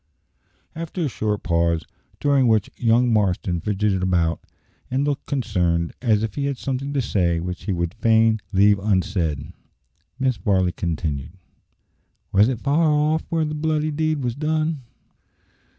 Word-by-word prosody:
After 165 +2 -5
a 160 - +1
short 105 -2 -2
pause, 85 -1 +1 0.3
during 140 -3 +3
which 110 -3 +2
young 120 0 +3
Marston 90 -4 0
fidgeted 105 -1 0
about 85 -3 +1 0.5
and 130 +2 0
looked 145 -1 -2
concerned, 90 - 0
as 110 -4 +2
if 110 -3 -3
he 140 - -2
had 140 -2 -2
something 135 +2 -3
to 135 -3 0
say 85 -6 +1
which 90 +1 -5
he 105 - -1
would 85 -1 -1
fain 110 0 +3
leave 100 +1 +4
unsaid, 90 -7 -1 0.7
Mrs. 130 -3 0
Varley 95 -5 +2
continued, 80 -4 -3 1.0
"Was 100 +4 +5
it 120 -3 -3
far 155 +3 +2
off 150 +2 +1
where 165 -1 +1
the 150 - -3
bloody 155 0 0
deed 155 -1 -1
was 120 -1 -1
done?" 155 +1 -1
110 Hz, 150 wpm, -22 LUFS, 90-140 Hz, 1.0 s, Was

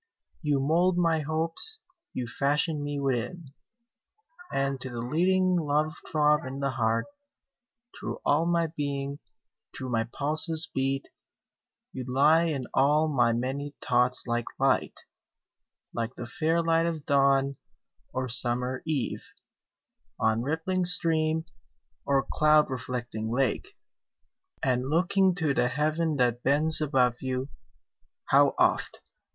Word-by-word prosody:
26 150 - -4
You 140 -2 +3
mould 170 +6 +2
my 165 -2 +2
Hopes 165 - -1 0.3
you 125 - -4
fashion 145 +5 0
me 145 0 -3
within: 135 +3 -3 1.0
And 135 -1 -1
to 130 - -4
the 120 - -7
leading 180 +8 +1
love 155 0 0
throb 150 -1 +2
in 130 +1 -6
the 140 -1 -1
heart, 115 -2 0 0.9
Through - - -6
all 160 +4 +2
my 170 -1 +2
being, 140 -1 -3 0.6
through 130 - -5
my 115 -1 0
pulses 155 +5 +2
beat; 135 +1 -1 0.8
You 130 - -5
lie 150 +6 +4
in 145 -6 -2
all 150 +3 +3
my 120 -5 +2
many 135 +5 -3
thoughts 125 0 +1
like 120 -1 -1
Light, - - 0 0.9
Like 115 +2 -3
the 120 - -6
fair 165 +5 0
light 165 0 +2
of 160 -3 -4
Dawn, 140 -1 +2 0.5
or 130 0 -3
summer 125 +1 -1
Eve, 150 -5 -2 1.0
On 110 +1 +1
rippling 160 +7 -1
stream, 160 -3 +2 0.6
or 135 -1 +2
cloud 150 -1 +3
reflecting 120 -3 -4
lake; 125 -1 -1 0.9
And 130 0 0
looking 185 +3 +2
to 160 -5 0
the 125 -2 +2
Heaven 155 +4 0
that 120 -3 +1
bends 155 +4 +4
above 125 -5 +2
you, 130 +1 -3 0.8
How - - +4
oft! - - +1
140 Hz, 125 wpm, -27 LUFS, 130-160 Hz, 1.0 s, lie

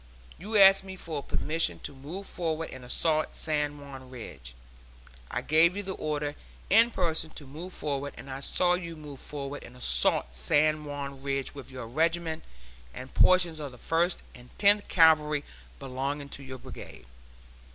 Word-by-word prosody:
You 210 +5 -1
asked 195 -1 +8
me 190 0 -8
for 160 -5 -5
permission 160 +3 0
to - - -4
move 155 +9 -8
forward 165 -3 -3
and 130 - -9
assault 155 +5 +1
San 150 -2 -1
Juan 135 -2 -10
Ridge. 70 - -9 0.7
I - - -3
gave 165 +5 +5
you 205 - -3
the 190 - -4
order 150 -3 -2 0.4
in 225 +4 +7
person 165 -7 0
to 150 - -7
move 160 +7 -8
forward, 145 -4 -3
and - - -10
I 135 0 -5
saw 175 +5 +3
you 170 -2 -3
move 150 -3 -10
forward 140 -1 -6
and 125 - -12
assault - - +2
San 150 - +2
Juan 140 -2 -6
Ridge 135 -1 -2
with 140 -2 -10
your 130 -3 -7
regiment 165 +5 0 0.5
and 130 +1 -9
portions 175 -3 +4
of 145 -3 -5
the - - -12
First 170 +6 0
and 125 0 -14
Tenth 205 0 +4
Cavalry 150 -3 +4 0.3
belonging 140 +2 -4
to 140 - -7
your 130 -1 -8
Brigade. 125 - -11
150 Hz, 165 wpm, -28 LUFS, 135-165 Hz, 0.7 s, asked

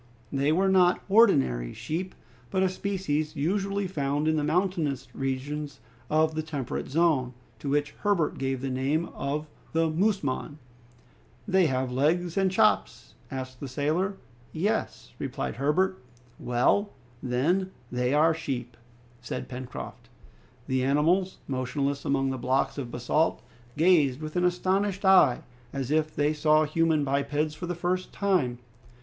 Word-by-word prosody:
They 140 +2 +2
were 190 +5 +3
not 185 -2 +4
ordinary 65 - +4
sheep, 180 +4 -4 0.3
but 190 +6 +1
a 190 - +3
species 180 -6 -2
usually 195 +6 0
found 145 -3 -1
in 160 - +3
the 150 - 0
mountainous 165 -3 0
regions 140 +2 -3 0.3
of 155 +1 +3
the 155 - -1
temperate 145 -5 -4
zone, 140 -5 +2 0.2
to 140 - -4
which 145 +1 +1
Herbert 200 -7 +1
gave 135 -1 -1
the 135 -1 -2
name 140 +6 0
of 150 +2 -3 0.3
the 165 0 +2
musmon. 155 -6 -1 1.0
"Have 135 -9 +3
they 125 - -5
legs 165 +5 +1
and 195 -1 +3
chops?" 215 +2 +1 0.2
asked 130 -2 -6
the 140 - -5
sailor. 155 +9 -1 0.3
"Yes," 205 +7 -2
replied - - -4
Herbert. 180 +8 +1 0.4
"Well, 125 - +2 0.3
then, 155 +10 +1 0.2
they 125 0 0
are 155 +3 +4
sheep!" 125 -7 -4 0.5
said 120 - -5
Pencroft. 125 0 -8 0.6
The 130 -1 0
animals, 165 +8 +2
motionless 140 +2 -2
among 135 -1 +1
the 130 - -4
blocks 130 +3 0
of 125 -4 -4
basalt, 125 +7 0 0.3
gazed 155 -6 +4
with 155 +1 -7
an 180 0 +2
astonished 190 +2 0
eye, 185 -10 +5 0.3
as 135 -1 -3
if 155 0 +2
they 150 +1 +2
saw 155 0 +4
human 155 0 +2
bipeds 145 +2 0
for 175 +3 -6
the 175 - -2
first 180 +2 -2
time. 180 -12 +1
150 Hz, 140 wpm, -27 LUFS, 135-180 Hz, 1.0 s, eye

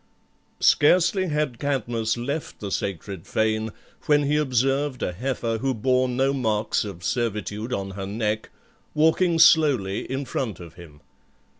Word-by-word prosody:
Scarcely 185 +5 +4
had 150 -6 -1
Cadmus 120 -5 -1
left 140 +6 -4
the 100 -2 -5
sacred 95 -2 -4
fane, 110 0 0 0.4
when 145 -1 +4
he 145 +1 +1
observed 135 -1 0
a - - -1
heifer 115 +2 -2
who 135 +1 -1
bore 130 +3 +1
no 135 +2 +1
marks 110 -5 0
of 95 -5 -8
servitude 105 +4 -2
on 95 -5 -3
her 95 0 -6
neck, 110 +1 -2 0.5
walking 165 +3 +3
slowly 140 - +4
in 135 +1 -2
front 115 -6 -3
of 85 -3 -11
him. 80 -4 -14
120 Hz, 140 wpm, -24 LUFS, 105-140 Hz, 0.5 s, Scarcely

